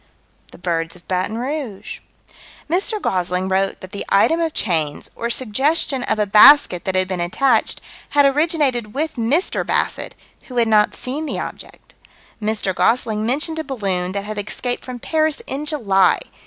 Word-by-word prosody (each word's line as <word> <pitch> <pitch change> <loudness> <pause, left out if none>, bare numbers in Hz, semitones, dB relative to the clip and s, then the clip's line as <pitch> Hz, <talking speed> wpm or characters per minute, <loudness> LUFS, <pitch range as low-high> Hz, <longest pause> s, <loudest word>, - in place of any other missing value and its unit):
The - - -13
birds 165 -1 -2
of 175 - -19
Baton 185 +4 -1
Rouge. 255 -5 -5 0.7
Mr. 385 +6 0
Gosling 180 - -1
wrote 195 +1 0
that 185 - -10
the 200 - -5
item 320 +12 +3
of 330 -1 0
chains, 160 -7 -1
or 235 - -3
suggestion 265 +4 +1
of 220 - -1
a 210 - +1
basket 210 - +6
that 190 - -1
had 185 0 +2
been 185 -1 -3
attached, 185 +11 +1 0.3
had 285 -1 +4
originated 275 -6 +1
with 315 +3 -1
Mr. 265 +10 0
Bassett, - - -1 0.3
who 250 - -7
had 235 -1 +3
not 210 -1 +3
seen 290 +5 -5
the - - -3
object. - - -9 0.5
Mr. 210 -3 -1
Gosling 220 +1 +1
mentioned 305 +6 -1
a - - -2
balloon 190 -10 -2
that 200 0 -3
had 215 0 -5
escaped 245 +4 -4
from 255 -1 -7
Paris 310 +4 0
in 290 +3 -4
July. 200 - +3
225 Hz, 165 wpm, -20 LUFS, 190-285 Hz, 0.7 s, basket